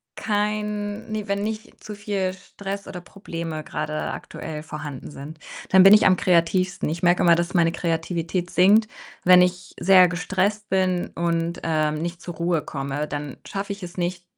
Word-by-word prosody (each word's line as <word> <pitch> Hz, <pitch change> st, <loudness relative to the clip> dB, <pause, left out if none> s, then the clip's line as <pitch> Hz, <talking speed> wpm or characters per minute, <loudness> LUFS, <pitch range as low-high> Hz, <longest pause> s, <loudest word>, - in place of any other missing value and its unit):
kein 210 Hz, 0 st, -2 dB
ne, 215 Hz, -1 st, -3 dB
wenn 200 Hz, 0 st, -1 dB
nicht 215 Hz, +1 st, -6 dB
zu 210 Hz, -, -7 dB
viel 200 Hz, -2 st, -2 dB
Stress 195 Hz, +1 st, -7 dB
oder 180 Hz, -, -7 dB
Probleme 165 Hz, -4 st, -6 dB
grade 155 Hz, 0 st, -4 dB, 0.2 s
aktuell 155 Hz, -1 st, -7 dB
vorhanden 150 Hz, -3 st, -7 dB
sind. 150 Hz, +2 st, -10 dB, 0.3 s
Dann 190 Hz, 0 st, +7 dB
bin 195 Hz, +1 st, +9 dB
ich -, -, +4 dB
am 185 Hz, -1 st, +5 dB
kreativsten. 180 Hz, +1 st, +1 dB
Ich 165 Hz, +2 st, -4 dB
merke 175 Hz, 0 st, +3 dB
immer, 170 Hz, -, +6 dB
dass 175 Hz, +2 st, -2 dB
meine 165 Hz, -1 st, +4 dB
Kreativität 170 Hz, +1 st, -2 dB
sinkt, 205 Hz, +5 st, +5 dB, 0.4 s
wenn 180 Hz, 0 st, +7 dB
ich 180 Hz, 0 st, -1 dB
sehr 185 Hz, -1 st, +7 dB
gestresst 195 Hz, +4 st, -1 dB
bin 185 Hz, -2 st, +1 dB
und, 170 Hz, 0 st, -1 dB
ähm, 155 Hz, -2 st, +1 dB
nicht 170 Hz, +1 st, -5 dB
zur 175 Hz, -, -7 dB
Ruhe 170 Hz, -1 st, 0 dB
komme, 140 Hz, +2 st, -4 dB
dann 145 Hz, -2 st, -5 dB
schaffe 200 Hz, +1 st, -4 dB
ich 200 Hz, -, -12 dB
es 175 Hz, +1 st, -9 dB
nicht, 175 Hz, 0 st, -2 dB
180 Hz, 170 wpm, -23 LUFS, 165-195 Hz, 0.4 s, bin